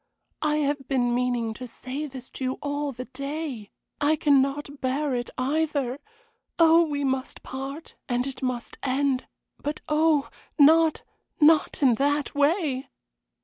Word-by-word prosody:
I 300 -1 +1
have 290 -2 -1
been 245 -3 +1
meaning 245 -2 0
to 250 +3 -8
say 260 +5 -6
this 260 -2 -9
to - - -7
you 255 0 0
all 285 +1 -3
the 255 0 -7
day. 275 -4 -5 0.3
I 295 +2 +4
cannot 285 -1 +1
bear 270 +2 0
it 240 -1 -2
either. 285 -1 0 0.6
Oh, 330 0 +6
we 285 -1 -2
must 265 -1 -2
part, 270 +4 -7 0.2
and 245 0 +1
it 270 -1 -6
must 250 -2 -3
end; 270 -1 0 0.3
but 295 +1 -3
oh, 300 -1 +3 0.3
not 320 +2 +5 0.4
not 305 -1 +4
in 255 -3 +6
that 290 0 +1
way!" 285 -2 +1
280 Hz, 145 wpm, -26 LUFS, 255-300 Hz, 0.6 s, Oh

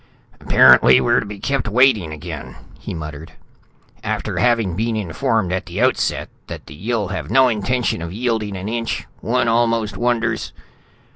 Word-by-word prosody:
"Apparently - - +6
we're - - +2
to - - -5
be 105 0 -7
kept 135 +3 -2
waiting 110 -7 +3
again," 80 -1 -8 0.2
he - - -7
muttered. 75 -1 -7 0.7
"After - - -3
having 115 -7 +2
been 115 +3 -1
informed 110 0 -1
at 95 0 -3
the 90 +4 -5
outset 130 +2 +1 0.2
that - - -8
the - - -11
Yill 105 +4 -2
have 95 - -5
no 130 -1 +5
intention 115 -2 -1
of 85 0 -5
yielding 110 -2 -2
an 95 +2 -6
inch, 115 +1 -3
one 125 +1 0
almost 115 -2 +1
wonders...." 115 -2 -1
110 Hz, 155 wpm, -20 LUFS, 95-120 Hz, 0.7 s, Apparently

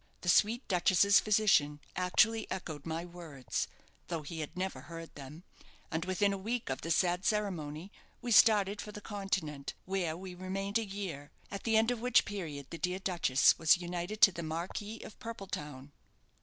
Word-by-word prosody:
The 180 - -2
sweet 225 +8 +3
duchess's 190 +1 +5
physician 195 -9 +3 0.2
actually 215 +5 +2
echoed 160 -5 -5
my 165 +1 -3
words, 165 -7 -4 0.4
though 165 -3 -3
he 160 +3 -6
had 155 +3 -6
never 190 +1 -3
heard 165 -1 -9
them; 145 +4 -10 0.5
and 160 +2 -1
within 200 +2 +1
a 195 - -4
week 225 - -2
of 130 - -3
the 165 - -5
sad 180 +2 +2
ceremony 185 -5 -2 0.3
we 245 0 -4
started 205 -2 +5
for 210 - -8
the 210 - -8
Continent, 190 -9 -3
where 180 -4 -1
we 185 0 -8
remained 195 +3 -2
a - - -2
year; 190 -8 -6 0.2
at 200 - -6
the 225 -1 +3
end 225 +2 +3
of 240 -2 -3
which 250 -1 +4
period 160 -9 -5
the 165 - -6
dear 180 +1 -1
duchess 175 -9 +3
was 160 +1 +6
united 175 +4 -5
to 195 - +9
the 170 - -6
Marquis 175 +7 -4
of 215 - -11
Purpeltown." 150 - -7
185 Hz, 175 wpm, -32 LUFS, 160-205 Hz, 0.5 s, to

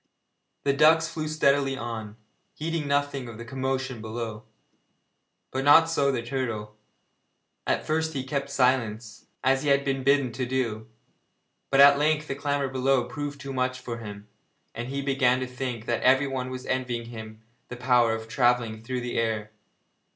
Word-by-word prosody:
The 140 - +2
ducks 160 +3 +5
flew 160 -2 -4
steadily 140 -3 +2
on, 110 -3 -5 0.4
heeding 160 -1 -3
nothing 140 -2 0
of 115 - -9
the 120 - -8
commotion 130 -1 -3
below; 110 -1 -5 1.1
but 130 - -2
not 160 +3 +6
so 140 -4 +2
the 120 -3 -2
turtle. 115 -4 -3 0.9
At - - 0
first 160 +1 0
he 135 -3 -3
kept 140 +1 -3
silence, 120 -5 0 0.2
as 135 +1 +3
he 145 - -1
had 140 0 +3
been 135 -1 0
bidden 140 -2 +3
to 125 +2 -3
do, 115 -4 -2 0.8
but 135 0 +5
at 140 0 +8
length 155 0 +1
the - - -2
clamour 140 0 -1
below 130 0 +2
proved 145 +4 -5
too 140 -1 -6
much 130 0 -1
for 120 -2 -6
him, 105 -2 -9 0.5
and 120 +2 -5
he 140 +1 -3
began 135 -2 +2
to 130 - -2
think 125 -3 -5
that 120 -1 -1
everyone 130 0 +2
was 130 0 -6
envying 120 -2 -2
him 110 -1 -9 0.2
the 125 - -8
power 120 -2 +3
of 110 0 -7
travelling 120 -2 +1
through 125 +2 -3
the 120 -1 -2
air. 110 -2 -1
130 Hz, 165 wpm, -26 LUFS, 115-140 Hz, 1.1 s, at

